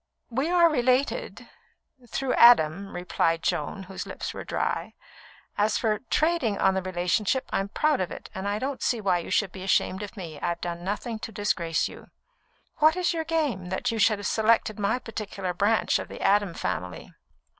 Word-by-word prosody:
"We 270 +7 0
are 350 -1 +6
related 255 -2 0 0.6
through 265 +3 -1
Adam," 195 -5 +5
replied 170 -2 0
Joan, 175 +6 -2
whose 190 0 -7
lips - - -5
were - - -6
dry. - - -2 0.6
"As 210 +1 +2
for 215 -3 0
'trading' 310 -10 +1
on 190 - +3
the 190 - 0
relationship, 185 +7 0
I'm 195 +1 0
proud 300 +2 +1
of 185 - -1
it, - - -8
and 190 +1 -4
I 205 +1 0
don't 270 +4 -3
see 240 - +1
why 190 -4 +1
you - - -7
should 200 -4 +1
be 185 - -9
ashamed 190 0 +1
of 210 +2 -8
me. 165 -6 -7
I've 170 0 -1
done 175 0 -5
nothing 215 +4 -3
to 225 - -6
disgrace 185 -5 0
you." - - -12 0.7
"What 310 +2 +5
is 360 -1 +1
your 325 -1 -2
game, 300 - -1
that 230 +6 -1
you 225 - -3
should 215 -1 +4
have 205 - -7
selected 220 0 +2
my 205 +4 +1
particular 205 -6 -5
branch 205 +5 +2
of - - -6
the - - -9
Adam 200 -3 +2
family?" 90 -1 -4
205 Hz, 185 wpm, -26 LUFS, 185-245 Hz, 0.7 s, are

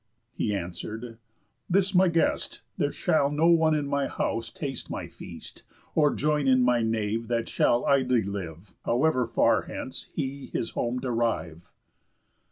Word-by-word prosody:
He 105 - -1
answer'd: 105 +6 -6 0.5
"This 190 +2 +2
my 185 0 +5
guest. 165 -1 0
There - - 0
shall 140 -3 +2
no 150 +3 +1
one 160 -2 +4
in 150 -1 0
my 140 0 0
house 115 0 -2
taste 135 -3 -5
my - - -4
feast, - - -10 0.3
Or 150 -2 +4
join 150 -1 +1
in 130 -1 +5
my 125 -1 +3
nave, 110 0 -1
that 115 -1 -1
shall 120 - +2
idly 130 -4 +3
live, 95 -2 -6
However 130 0 +2
far - - +3
hence - - -6
he 135 +1 -4
his 115 - -3
home 120 +1 -1
derive." 115 -9 -2
125 Hz, 150 wpm, -27 LUFS, 110-145 Hz, 0.5 s, my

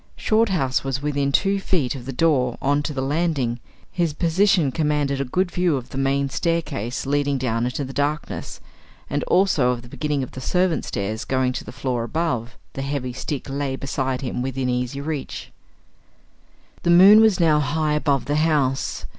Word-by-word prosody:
Shorthouse 190 - +1
was 135 +1 -3
within 140 -1 0
two 195 +6 +2
feet 165 -10 0
of 125 -2 -9
the - - -3
door 130 -4 +1
on 145 +1 +1
to 150 - -3
the 135 -2 -3
landing; 140 -5 0 0.3
his 170 -4 0
position 175 -1 +2
commanded 150 -2 0
a - - -1
good 180 +8 0
view 175 -5 +1
of 125 -1 -8
the - - -7
main 140 +1 +1
staircase 135 - -2
leading 145 0 +1
down 120 -2 -1
into 130 +3 -2
the 135 - -8
darkness, 145 +2 -3 0.5
and - - 0
also 180 -9 +3
of 120 -1 -2
the - - -12
beginning 145 +2 -2
of 130 - -7
the 130 - -8
servants' 180 +5 0
stairs 105 +2 -3
going 130 -1 0
to - - -5
the 110 - -9
floor 130 -2 -2
above; 125 -3 -2 0.2
the 135 - -4
heavy 135 -2 -3
stick 135 +2 -4
lay 135 -1 -2
beside 135 -1 -2
him 125 -2 -3
within 130 0 -2
easy 125 +2 -2
reach. 145 -1 -5 1.3
The - - -1
moon 195 +5 +8
was 220 -4 +4
now 160 -3 +4
high 150 +1 0
above 145 -3 +1
the 145 +1 0
house. 145 -4 0
140 Hz, 180 wpm, -22 LUFS, 130-160 Hz, 1.3 s, moon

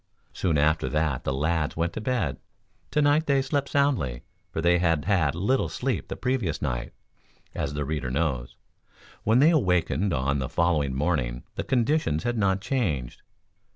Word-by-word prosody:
Soon 85 -5 0
after 80 +2 +2
that 75 -4 -1
the - - 0
lads 75 +3 -1
went 85 +1 0
to - - -4
bed. 110 - -1 0.5
Tonight 150 +1 +2
they 140 -1 +3
slept 140 +1 -1
soundly, 130 - +1 0.3
for - - -3
they 85 +1 +3
had 80 -4 +1
had 85 -8 +2
little 105 +10 +1
sleep 130 0 -2
the - - -5
previous 125 - -1
night, - - -3 0.6
as 75 - -3
the 75 -1 -2
reader 70 -3 -2
knows. 65 -3 -1 0.7
When 110 +3 +4
they 150 +6 +6
awakened 90 - +1
on 70 -1 0
the 65 - -3
following 75 -6 +1
morning 65 -5 -1
the - - -3
conditions 120 - +1
had 120 0 -1
not 95 -1 +2
changed. 95 - -2
85 Hz, 160 wpm, -26 LUFS, -, 0.7 s, they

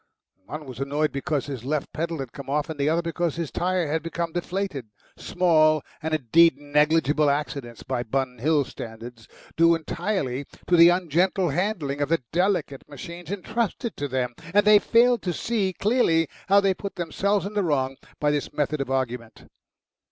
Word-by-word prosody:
One 155 0 -7
was 130 -2 -9
annoyed 145 +3 0
because 140 +1 -2
his 135 -5 -6
left 145 +2 -2
pedal 165 +1 -2
had 135 -4 -6
come 140 -1 -9
off, 150 +2 -1
and 155 - -8
the 140 +1 +2
other 165 +2 +1
because 170 -1 -2
his 165 -3 -4
tyre 180 -1 0
had 160 +2 -1
become 165 +1 -3
deflated, 175 - -3 0.3
small 155 -4 +3 0.2
and 160 0 -3
indeed 155 +3 +4
negligible 150 +1 +2
accidents 140 -5 -3
by 130 -2 -2
Bun 125 +1 -2
Hill 145 +2 +2
standards, 115 0 -9 0.3
due 165 +1 +5
entirely 160 -5 -2 0.2
to 180 - +3
the 170 0 +8
ungentle 180 +1 +1
handling 155 -4 -1
of 145 - 0
the 165 -5 +1
delicate 175 -6 0
machines 175 -1 -9
entrusted 215 +3 -2
to 145 - -2
them 125 -2 -2 0.2
and 205 - +5
they 210 0 +7
failed 240 +3 +3
to 180 - -2
see 205 -1 -1
clearly 185 -6 +2 0.2
how 200 +1 +7
they 195 -1 +2
put 195 +2 -7
themselves 195 +4 0
in 200 - -5
the 210 - +1
wrong 135 -6 0 0.2
by 150 0 +2
this 145 -1 -2
method 150 0 -1
of 135 - -4
argument. 125 -3 -3
155 Hz, 175 wpm, -25 LUFS, 140-180 Hz, 0.3 s, the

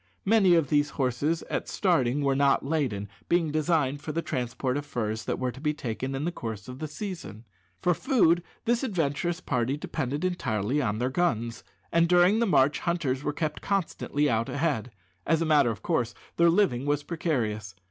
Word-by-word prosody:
Many 195 -4 +5
of 160 -5 +2
these 145 0 +3
horses, 140 +5 0
at - - -3
starting, 145 - +1
were 135 -1 +2
not 140 0 +3
laden, 135 -10 -1 0.2
being 170 -3 +2
designed 150 -3 +1
for 155 - -4
the 165 +2 -2
transport 125 +1 -2
of 145 - -2
furs 110 -5 -3
that - - -1
were 130 -1 -1
to 130 - -12
be 150 -1 0
taken 130 +1 -4
in 140 +3 -2
the 175 - 0
course 110 - -6
of 125 +1 -8
the 155 - -3
season. 155 - -7 0.4
For 180 - +4
food 175 -7 +3 0.2
this 235 +1 +2
adventurous 175 - -1
party 125 -2 0
depended 145 +2 -3
entirely 130 - 0
on 105 -5 -1
their 125 +3 -1
guns, 120 -8 -1 0.3
and 170 0 +3
during 180 +4 +5
the 235 - +2
march 145 -6 +3
hunters 145 -6 -1
were 150 - 0
kept 155 +1 -3
constantly 165 -6 0
out 115 -3 0
ahead. 140 -6 -1 0.4
As 165 0 +3
a 165 - 0
matter 150 -6 +4
of 115 - -5
course, 120 -9 0 0.2
their 170 0 +5
living 165 -8 +2
was 145 0 +1
precarious. 110 - -2
145 Hz, 190 wpm, -27 LUFS, 125-170 Hz, 0.4 s, Many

